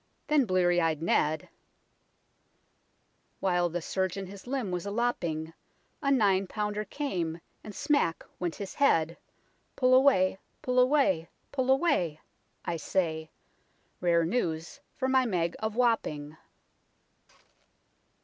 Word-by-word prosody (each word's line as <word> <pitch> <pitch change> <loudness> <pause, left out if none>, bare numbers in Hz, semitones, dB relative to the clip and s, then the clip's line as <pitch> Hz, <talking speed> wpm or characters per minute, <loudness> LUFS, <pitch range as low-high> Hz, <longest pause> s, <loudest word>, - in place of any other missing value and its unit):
Then 300 -3 +3
blear 185 -2 +3
ey'd 165 -3 +2
Ned 155 -1 +1 0.5
" - - -43
While 175 -2 +1
the 170 0 -4
surgeon 190 +2 -2
his 195 +4 -11
limb 255 -7 -2
was 180 +2 -3
a - - -1
lopping, 170 -9 -1 0.5
A 280 - 0
nine 200 -7 +3
pounder 210 +1 -2
came, 175 - -3 0.2
and 210 - -9
smack 290 - +1
went 175 -2 -2
his 200 -2 -6
head, 165 - +2 0.6
Pull 255 0 +3
away, 225 -9 +4 0.2
pull 250 0 +2
away, 250 - +3 0.2
pull 260 -2 -1
away! 265 - +2 0.5
I 170 - -1
say; 160 -3 -1 0.7
Rare 170 -2 +3
news 170 - -2 0.2
for 260 - -1
my 260 -1 +3
Meg 170 -5 0
of 220 0 -3
Wapping." 160 -12 0
190 Hz, 120 wpm, -29 LUFS, 170-250 Hz, 0.7 s, away